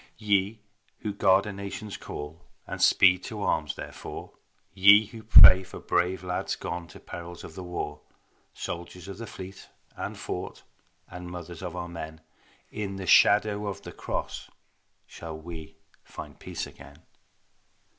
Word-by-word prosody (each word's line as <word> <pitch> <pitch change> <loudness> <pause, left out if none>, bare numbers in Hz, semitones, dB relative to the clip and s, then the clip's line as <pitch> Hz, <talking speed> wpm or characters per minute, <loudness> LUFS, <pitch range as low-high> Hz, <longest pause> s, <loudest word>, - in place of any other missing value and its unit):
Ye 105 0 +1 0.4
who 105 - -2
guard 95 0 +4
a 105 - -4
nation's 100 +1 -6
call 75 +3 -7 0.2
And - - -6
speed 90 -1 +6
to 105 -2 -5
arms 75 -3 0
therefor, - - -8 0.4
Ye 100 +3 +8
who 110 +2 -10
pray 95 -4 +10
for 95 - -10
brave 90 +1 0
lads 90 0 -2
gone 85 -1 -5
To - - -13
perils 85 0 -8
of - - -9
the 95 - -7
war; 75 -4 -5 0.5
Soldiers 85 +1 -6
of 100 +1 -8
the 115 - -6
fleet 95 0 -10 0.3
and - - -5
fort - - -5 0.4
And 90 -1 -8
mothers 85 -1 -8
of 90 -2 -5
our 90 -1 -4
men, 80 -2 -7 0.5
In 100 -2 -4
the 95 -1 -5
shadow 105 +1 +5
of 100 - -5
the - - -8
Cross - - -4 0.6
Shall 80 -2 -8
we 80 0 -9 0.3
find - - -10
peace - - -5
again. - - -14
95 Hz, 150 wpm, -28 LUFS, 85-100 Hz, 0.6 s, pray